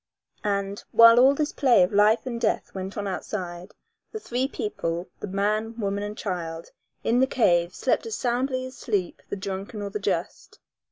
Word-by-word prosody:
And, 200 0 -2
while 230 +1 +8
all 270 +3 +6
this 300 +1 -1
play 250 -9 +4
of 180 - -1
life 210 +4 +4
and 235 -2 -4
death - - 0
went 190 +2 -6
on 205 - -2
outside, 180 -1 -5 0.4
the 435 - -5
three 255 - -1
people, 175 - -3
the - - -5
man, 215 +4 -1
woman 200 -1 -1
and 210 +1 -5
child, 165 -4 -5 0.3
in 235 +2 +2
the 260 - +4
cave 175 -9 +2
slept 255 - 0
as 220 - -3
soundly 255 +1 -1
as 255 - -9
sleep 200 -7 -2
the - - -2
drunken 200 +2 -5
or 200 - -5
the 210 - -3
just. 200 - -3
210 Hz, 180 wpm, -25 LUFS, 190-240 Hz, 0.4 s, while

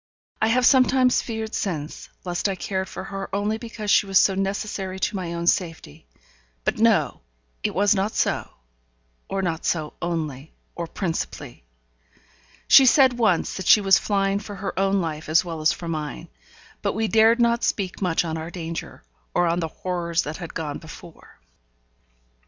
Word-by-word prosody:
I 220 - +4
have 245 +2 +3
sometimes 255 -1 +4
feared 220 -1 -5
since, 155 -7 -4 0.2
lest 175 +3 -1
I 195 - -2
cared 190 +1 -3
for - - -7
her 195 0 -6
only 210 +2 -1
because 220 -3 -4
she 205 - +4
was 195 -1 +3
so 195 - +5
necessary 195 -1 -3
to 200 - -1
my 180 -3 -4
own 170 0 -3
safety; 165 - -1 0.6
but, - - -1
no! - - +2 0.4
it - - -2
was 205 +2 +4
not 200 +2 -1
so; - - 0 0.8
or 195 0 -2
not 165 -3 -2
so 155 -3 -1
only, 155 -4 -4 0.2
or 170 -1 -5
principally. 160 - -5 1.0
She 270 -1 +8
said 255 -2 +5
once 210 -7 +2
that 190 - -5
she - - +8
was 195 -2 +5
flying 195 -1 0
for 205 0 -8
her 195 +1 -4
own 195 0 +2
life 155 -2 -5
as 165 +3 +4
well 165 -2 -5
as 155 - +4
for 170 - -6
mine; 155 -2 -5 0.5
but - - -1
we 220 +2 0
dared 225 +2 +4
not 235 0 +2
speak 190 -2 -1
much 180 -2 +1
on 160 -1 -3
our 160 +1 -6
danger, 165 - -7 0.3
or 175 - +3
on 170 +1 +1
the 165 - -1
horrors 170 0 -2
that 150 +2 -5
had 175 -3 -8
gone 150 -3 -4
before. 160 +1 -14
190 Hz, 175 wpm, -23 LUFS, 165-210 Hz, 1.0 s, She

